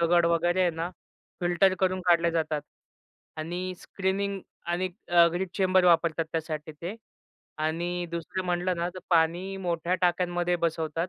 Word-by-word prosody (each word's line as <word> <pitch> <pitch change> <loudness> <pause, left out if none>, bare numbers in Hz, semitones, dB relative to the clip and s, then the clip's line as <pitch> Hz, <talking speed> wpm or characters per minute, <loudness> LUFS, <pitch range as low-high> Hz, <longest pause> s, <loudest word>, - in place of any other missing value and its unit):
दगड 170 0 +4
वगैरे 175 +2 +2
आहे 175 - +3
ना 165 +2 -4 0.5
फिल्टर 175 +2 +3
करून 185 0 +1
काढल्या 170 -1 +4
जातात. 155 -2 -1 0.7
आणि 175 +4 -4
स्क्रीनिंग 195 0 -2 0.3
आणि 175 +2 0 0.4
ग्रीड 185 +1 -2
चेंबर 185 -1 +3
वापरतात 170 -1 +3
त्यासाठी 155 -1 -3
ते. 170 +6 -6 0.6
आणि 175 +3 -1
दुसरं 170 +3 -4
म्हटलं 180 0 0
ना, 170 +1 -1
तर 185 - -6
पाणी 175 +3 +2
मोठ्या 175 -1 -1
टाक्यांमध्ये 175 0 +1
बसवतात. 165 0 -1
175 Hz, 135 wpm, -28 LUFS, 165-185 Hz, 0.7 s, दगड